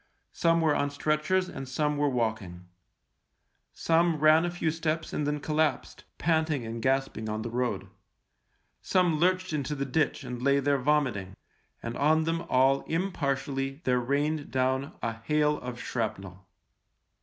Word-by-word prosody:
Some 165 0 +2
were 155 -2 +3
on 145 - +1
stretchers 155 +6 0
and 135 -7 -7
some 150 +3 0
were 145 0 +1
walking. 110 -8 -2 1.1
Some 165 0 +2
ran 155 +2 +5
a - - 0
few 170 -2 -1
steps 160 0 -2
and 150 - -1
then 150 0 -1
collapsed, 155 +1 -1
panting 160 -5 +1
and 115 +1 -5
gasping 130 -4 0
on 110 0 -3
the 115 - -5
road; 120 -6 -2 0.9
some 175 -4 +2
lurched 185 0 +1
into 150 0 -2
the 140 -1 -2
ditch 145 +2 0
and 125 -1 -6
lay 140 +1 +3
there 140 0 +1
vomiting, 125 -9 0 0.5
and 115 0 -4
on 155 +2 +3
them 165 +1 -1
all 135 +2 +4
impartially 140 -6 -2
there 125 -1 +2
rained 145 +4 -1
down 130 +2 0
a 115 0 -1
hail 150 +6 +1
of 125 -1 -7
shrapnel. 100 -7 -4
140 Hz, 150 wpm, -28 LUFS, 125-155 Hz, 1.1 s, ran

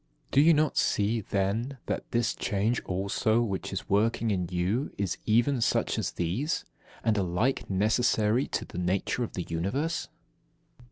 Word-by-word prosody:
Do 140 - +5
you 165 +2 +6
not 155 +1 +1
see, 110 +3 +2
then, 105 +8 -1
that - - -3
this 120 -1 +1
change 105 +4 0
also 100 +4 +1
which 100 -5 -3
is - - -4
working 110 +2 +2
in 90 -3 0
you 95 +10 -1
is 100 -3 -2
even 120 +4 +3
such - - +1
as - - -2
these, 100 - -1 0.4
and 110 -2 +2
alike 95 +8 0
necessary 110 +4 +2
to - - -3
the 90 - -7
nature 95 +7 0
of 115 - -5
the 90 - -3
Universe? 110 - -2
110 Hz, 155 wpm, -28 LUFS, 95-120 Hz, 0.4 s, you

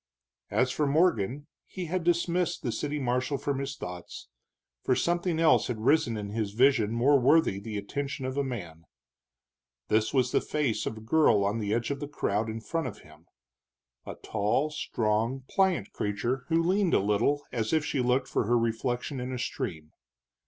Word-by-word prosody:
As 125 +5 +1
for 150 +1 0
Morgan, 140 - +1 0.2
he 185 -2 -6
had 180 +1 -2
dismissed 175 +1 0
the 120 - -1
city 150 +5 -3
marshal 125 +2 0
from 140 0 -2
his 135 0 -4
thoughts, 90 -5 -8 0.5
for 130 - +2
something 175 +1 0
else 165 -1 +4
had 115 -3 -4
risen 125 -7 +3
in 105 -1 -5
his 105 -2 -2
vision 120 -3 +3
more 135 +5 +4
worthy 135 -5 +3
the 105 +1 -5
attention 135 +6 -4
of 130 0 -3
a 140 - +1
man. 85 -11 -6 1.0
This 110 +1 +2
was 130 -2 +2
the - - +2
face 145 -7 -1
of 110 - -4
a - - -9
girl 110 -4 +3
on 105 +3 0
the 105 -2 -2
edge 115 +4 0
of 140 - -3
the 145 - -4
crowd 110 -6 -1
in 110 +1 -5
front 165 +4 -2
of 115 - -8
him, 75 +1 -18 0.8
a - - -7
tall, 110 +8 -1
strong, 115 -1 -1
pliant 190 - +1
creature 120 +6 -2
who 165 0 +2
leaned 185 +1 +2
a - - +5
little 105 +9 +1
as 110 -2 -2
if 155 -2 +2
she 140 - -1
looked 125 +2 +1
for - - 0
her 120 +3 +3
reflection 120 +4 -1
in 125 +1 -4
a 130 - -3
stream. 90 - -4
125 Hz, 185 wpm, -28 LUFS, 110-145 Hz, 1.0 s, a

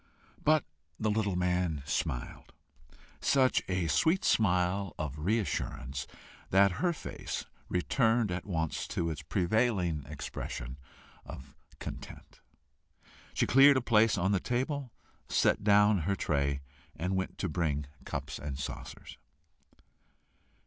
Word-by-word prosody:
But 155 -1 +4 0.3
the 110 -1 +1
little 105 -3 0
man 90 -4 0
smiled 65 -4 -3 0.7
such 130 -2 +3
a 90 -2 0
sweet 160 - +2
smile 95 -2 +2
of 75 -1 -4
re 100 +9 +2
assurance, 70 - -3 0.4
that 100 +1 +5
her 180 -1 +3
face 170 - -5 0.2
returned 115 +3 +2
at 90 - -3
once 80 -5 -2
to 85 -1 -1
its 75 -1 -5
prevailing 90 - +1
expression 65 -3 -6 0.4
of 65 - -10 0.2
content. - - -9 1.0
She - - +2
cleared 135 +1 +7
a - - +1
place 115 -2 +4
on 95 +3 +1
the 100 - +3
table, 130 - -2 0.4
set - - +2
down 105 0 +5
her 95 +5 0
tray, 70 -5 0 0.3
and 90 +4 -2
went 95 0 -2
to 95 - -1
bring 75 -4 -1 0.2
cups 70 +1 -5
and 70 -1 -5
saucers. 70 - -7
90 Hz, 120 wpm, -31 LUFS, 75-110 Hz, 1.0 s, cleared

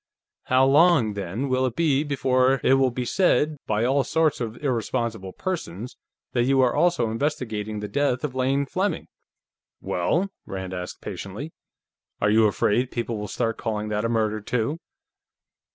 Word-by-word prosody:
"How 130 +1 +4
long, 140 -5 +5
then, 100 +7 -3
will 130 0 +1
it 120 - -5
be 150 -4 +2
before 130 -2 +2
it - - +5
will 135 -1 +4
be 125 +1 -4
said, 155 -1 +2
by 110 +2 +1
all 135 +2 +2
sorts 160 -3 +1
of 115 -1 -4
irresponsible 115 -6 -2
persons, 125 - -5 0.4
that 120 -1 +2
you 135 +1 +3
are 125 - +3
also 170 -11 +2
investigating 110 -5 -2
the 105 - -4
death 140 0 0
of 150 -4 -2
Lane 135 +2 +1
Fleming?" 185 +4 -1 0.7
"Well?" 170 - 0 0.2
Rand 95 -1 -5
asked 90 0 -6
patiently. 110 +12 -6 0.7
"Are 105 - +2
you 110 0 +5
afraid 115 +4 +1
people 115 -3 -3
will 105 - -4
start 115 +2 -2
calling 105 -1 -2
that 105 0 -1
a 115 - 0
murder, 110 -2 0
too?" 125 +8 -1
125 Hz, 160 wpm, -24 LUFS, 110-140 Hz, 0.7 s, long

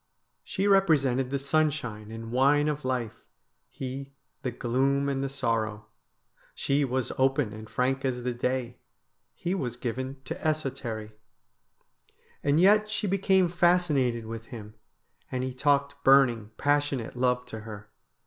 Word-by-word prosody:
She 195 +2 -1
represented 140 -10 +3
the 140 - 0
sunshine 140 -7 -1
and 115 0 -7
wine 140 +4 +3
of 150 -1 -2
life, 125 -4 -3 0.5
he 135 +1 -7 0.3
the 130 - -2
gloom 135 +3 0
and 135 -1 -1
the 135 - -2
sorrow. 115 -5 -1 0.7
She 140 +1 +1
was 130 -2 -1
open 135 -4 +2
and 110 0 -9
frank 130 +4 0
as 125 -2 -1
the 125 0 -1
day, 125 0 -2 0.6
he 175 - -2
was 130 -12 -2
given 130 +2 -4
to - - -3
esotery. 135 -8 -2 1.3
And 145 +2 +2
yet 210 +3 +5
she 215 0 -2
became 190 -1 +3
fascinated 165 -9 +2
with 115 0 -7
him, 105 -3 -9 0.6
and 130 0 -2
he 130 0 -3
talked 140 +1 +1
burning, 125 -6 +5
passionate 145 -5 0
love 125 0 +1
to 115 -3 -7
her. 105 -1 -10
130 Hz, 140 wpm, -28 LUFS, 120-145 Hz, 1.3 s, yet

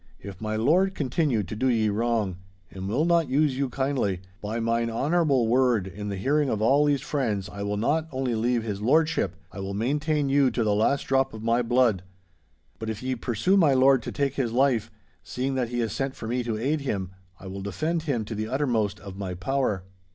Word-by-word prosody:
If 100 -1 -10
my 110 0 -2
lord 175 - +2
continue 135 - 0
to 105 - -6
do 130 +5 0
ye 110 -4 +2
wrong, 110 -3 0 0.3
and 95 0 -6
will 130 +10 +1
not 170 -4 +2
use 140 0 +2
you 135 0 -1
kindly, 130 -9 -1 0.2
by 110 +2 -3
mine 115 0 0
honourable 140 0 +2
word 120 -4 +3
in 105 +2 -6
the 100 - -3
hearing 140 +7 +1
of 110 - -1
all 135 +7 +4
these 140 -2 +1
friends, 115 - -1
I 100 - -8
will 100 0 -2
not 155 +9 +1
only 130 -2 -1
leave 115 +1 +1
his 105 -3 -4
lordship—I 105 - 0
will 95 0 -4
maintain 145 +6 0
you 135 -1 +4
to 120 - -1
the 105 -1 +2
last 110 +7 +2
drop 135 -2 +1
of 110 - -8
my 115 +1 +2
blood. 120 -5 +2 0.8
But 110 -1 -4
if 110 +2 -5
ye 130 0 -1
pursue 120 - +1
my 155 -8 +5
lord 130 0 +5
to - - -6
take 140 -2 -1
his 130 -5 -1
life, 125 -2 +2 0.3
seeing 130 +2 -3
that 125 -3 -1
he 120 - -3
has 115 - -2
sent 135 -1 -2
for 110 - -7
me 125 +2 0
to 115 -2 -2
aid 145 +7 0
him, 95 -9 -3 0.3
I - - -12
will 95 +1 -6
defend 155 - -2
him 135 -9 -2
to 110 - -6
the 110 0 -3
uttermost 120 -5 0
of 100 -1 -9
my 95 -2 -4
power. 105 0 -1
120 Hz, 215 wpm, -26 LUFS, 105-140 Hz, 0.8 s, my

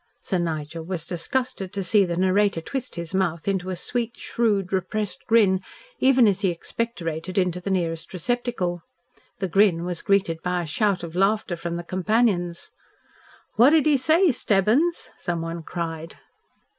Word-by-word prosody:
Sir 185 - -2
Nigel 160 -1 -3
was 170 -1 -4
disgusted 190 +2 -2
to 195 - -2
see 200 +2 +4
the 170 -1 -3
narrator 190 0 +2
twist 260 +10 -5
his 170 +2 -6
mouth 175 -3 -1
into 190 -2 -1
a 185 - -2
sweet, 235 +6 -3
shrewd, 205 -5 0
repressed 195 +2 -2
grin 200 -5 +4 0.4
even 260 -3 +5
as 200 -2 +2
he 195 - +2
expectorated 175 -2 -4
into 180 -1 +1
the 195 - -4
nearest 165 -3 -2
receptacle. 190 -3 -2 0.6
The 195 - -2
grin 185 -2 +3
was 175 -2 -3
greeted 190 -5 +1
by 180 -1 -1
a - - -5
shout 195 +4 0
of 170 0 -7
laughter 195 0 +1
from 170 0 -4
his 175 - -6
companions. 185 -2 0 0.9
"What 240 +5 +7
did 310 -1 +4
he 300 -2 +4
say, 320 +6 +4
Stebbins?" 235 - +1
someone 165 -1 -3
cried. 165 -1 -5
185 Hz, 155 wpm, -24 LUFS, 170-215 Hz, 0.9 s, What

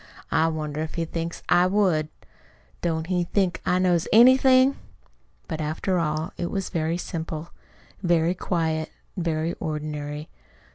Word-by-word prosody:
I 160 - +3
wonder 155 -2 -3
if 160 - -5
he 170 -2 -1
thinks 165 +1 -5
I 175 +1 +5
would! 185 -6 +2 0.7
Don't 160 -2 -1
he 180 0 0
think 185 0 0
I 180 - +3
knows 180 -2 +2
anything?" 260 +3 +6 0.7
But, 160 -2 -4
after 160 +4 -1
all, 155 0 -2
it 175 - -2
was 195 -1 -3
very 165 +1 -1
simple, 165 -2 -5 0.5
very 170 -2 +2
quiet, 160 -3 -1 0.3
very 165 -2 -1
ordinary. 150 -1 -4
Dr. 155 - -13
165 Hz, 140 wpm, -25 LUFS, 155-180 Hz, 0.7 s, anything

